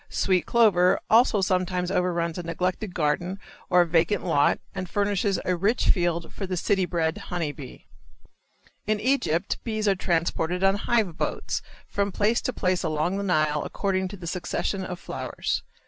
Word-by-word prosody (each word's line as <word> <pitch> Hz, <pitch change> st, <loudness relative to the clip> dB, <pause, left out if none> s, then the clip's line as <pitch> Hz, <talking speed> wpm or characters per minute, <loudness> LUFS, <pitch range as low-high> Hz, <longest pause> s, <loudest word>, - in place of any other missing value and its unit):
Sweet 185 Hz, -3 st, +1 dB
clover 200 Hz, -6 st, +4 dB
also 225 Hz, -2 st, +5 dB
sometimes 180 Hz, -1 st, 0 dB
overruns 175 Hz, -2 st, 0 dB
a -, -, -2 dB
neglected 180 Hz, +3 st, -3 dB
garden 175 Hz, +4 st, 0 dB, 0.3 s
or 180 Hz, -1 st, +5 dB
vacant 170 Hz, +4 st, +1 dB
lot 145 Hz, -5 st, +3 dB, 0.2 s
and 185 Hz, -2 st, -5 dB
furnishes 200 Hz, 0 st, 0 dB
a 180 Hz, -, +1 dB
rich 205 Hz, +7 st, +1 dB
field 175 Hz, -2 st, +1 dB
for 195 Hz, -, -5 dB
the 185 Hz, -1 st, -2 dB
city 190 Hz, +1 st, +1 dB
bred 165 Hz, -1 st, -1 dB
honey 170 Hz, -5 st, -1 dB
bee. 140 Hz, -3 st, -11 dB, 1.0 s
In 215 Hz, 0 st, +1 dB
Egypt 205 Hz, -, 0 dB
bees 215 Hz, -2 st, -2 dB
are 200 Hz, -, +5 dB
transported 175 Hz, 0 st, -1 dB
on 195 Hz, 0 st, +5 dB
hive 205 Hz, -5 st, 0 dB
boats -, -, -2 dB, 0.3 s
from 200 Hz, 0 st, -1 dB
place 215 Hz, +5 st, +1 dB
to -, -, -1 dB
place 185 Hz, -6 st, 0 dB
along 160 Hz, +3 st, -1 dB
the 200 Hz, -, -2 dB
Nile 155 Hz, -5 st, +1 dB
according 190 Hz, -2 st, -1 dB
to 200 Hz, +2 st, -8 dB
the 175 Hz, -, -9 dB
succession 180 Hz, +2 st, -2 dB
of 180 Hz, -1 st, -6 dB
flowers. -, -, -3 dB
180 Hz, 165 wpm, -25 LUFS, 170-200 Hz, 1.0 s, also